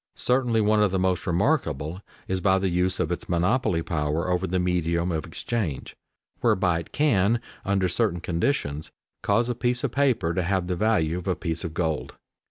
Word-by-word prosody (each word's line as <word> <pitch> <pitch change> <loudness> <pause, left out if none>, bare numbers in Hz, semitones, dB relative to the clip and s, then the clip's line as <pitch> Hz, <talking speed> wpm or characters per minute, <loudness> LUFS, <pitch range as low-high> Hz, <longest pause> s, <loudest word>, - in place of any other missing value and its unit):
Certainly 125 -3 +2
one 105 0 +3
of 105 - +4
the 95 - -1
most 95 0 0
remarkable 85 - 0 0.3
is 95 0 -1
by 95 0 +4
the 95 0 0
use 90 +1 0
of 80 - 0
its 90 - -4
monopoly 90 0 +1
power 80 +2 -1
over 90 +1 0
the 90 +1 0
medium 90 -1 0
of 80 -2 -3
exchange, 105 - -3 0.4
whereby 90 -3 +2
it 85 - -9
can, 115 -6 +2 0.2
under 95 -1 +1
certain 90 0 0
conditions, 85 - -1 0.3
cause 115 +4 +2
a 125 - 0
piece 120 +1 -1
of 140 - 0
paper 120 -11 +1
to 90 - 0
have 95 0 0
the 90 0 -1
value 90 -5 +1
of 90 - -9
a 95 - +1
piece 80 -1 -3
of 80 -2 -5
gold. 80 -3 -2
90 Hz, 185 wpm, -25 LUFS, 85-105 Hz, 0.4 s, of